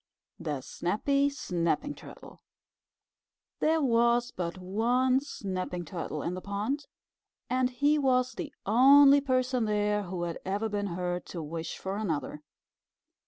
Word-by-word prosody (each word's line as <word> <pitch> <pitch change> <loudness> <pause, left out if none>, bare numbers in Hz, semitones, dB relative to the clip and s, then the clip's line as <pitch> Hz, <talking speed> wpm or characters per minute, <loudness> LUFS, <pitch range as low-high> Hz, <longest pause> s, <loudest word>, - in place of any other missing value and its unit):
THE 145 -3 -3
SNAPPY 275 - 0
SNAPPING 180 - -1
TURTLE - - -13 1.2
There 320 0 +2
was 240 0 +3
but 175 0 -4
one 240 +8 +1
Snapping 185 -9 -5
Turtle 165 -5 -5
in 170 - -2
the 185 - -5
pond, 215 +10 -3 0.6
and 255 0 +2
he 285 +4 +2
was 255 -2 +2
the - - -6
only 275 +6 +7
person 255 -3 +1
there 210 0 +1
who 175 -1 -4
had 170 -1 -4
ever 205 +4 -2
been 205 -1 -2
heard 180 0 -3
to 170 -3 -6
wish 160 +1 -5
for 190 +1 -4
another. 160 -7 -3
210 Hz, 130 wpm, -29 LUFS, 180-255 Hz, 1.2 s, only